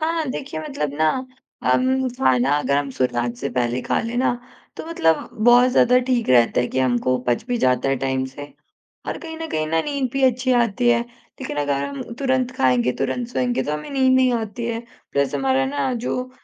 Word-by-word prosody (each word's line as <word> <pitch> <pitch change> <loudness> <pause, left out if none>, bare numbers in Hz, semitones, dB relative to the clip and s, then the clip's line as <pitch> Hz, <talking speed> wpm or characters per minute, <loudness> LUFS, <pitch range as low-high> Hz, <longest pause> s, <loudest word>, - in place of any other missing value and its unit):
हाँ, 325 +1 0
देखिए 275 +4 -5
मतलब 270 - -4
ना 155 0 +4 0.5
अम, 260 0 +2
खाना 135 - +1
अगर 140 -1 0
हम 140 -1 -1
सूर्यास्त 120 -2 -1
से - - -3
पहले 120 0 -1
खा - - 0
ले 230 +1 -4
ना, 250 0 +2 0.4
तो - - -7
मतलब 165 - +1 0.2
बहुत 245 +1 +6
ज़्यादा 250 0 +4
ठीक 245 -3 0
रहता 120 -1 +4
है 125 - 0
कि - - -3
हमको 130 0 +1
पच 120 -1 +1
भी 245 -1 0
जाता 125 - +2
है 135 - +1
टाइम 130 0 0
से। 140 +2 -9 0.6
और - - -3
कहीं 320 -1 -8
न 325 0 -5
कहीं, 155 0 -1
ना 165 +1 +1
नींद 280 -3 -2
भी 275 - -1
अच्छी 255 0 +2
आती 240 0 +2
है, 235 -1 +3 0.4
लेकिन 260 - -5
अगर 140 -1 0
हम 140 0 -5 0.2
तुरंत 260 -2 0
खाएँगे, 125 -1 +2
तुरंत 235 - -2
सोएँगे, 245 0 -1
तो 150 - -3
हमें 150 - -5
नींद 265 -2 +3
नहीं 255 -1 +3
आती 230 +1 -3
है। 230 -1 -2 0.3
प्लस 140 +1 0
हमारा 135 -1 +1
ना 145 - -1
जो 255 0 -2
220 Hz, 205 wpm, -22 LUFS, -, 0.6 s, बहुत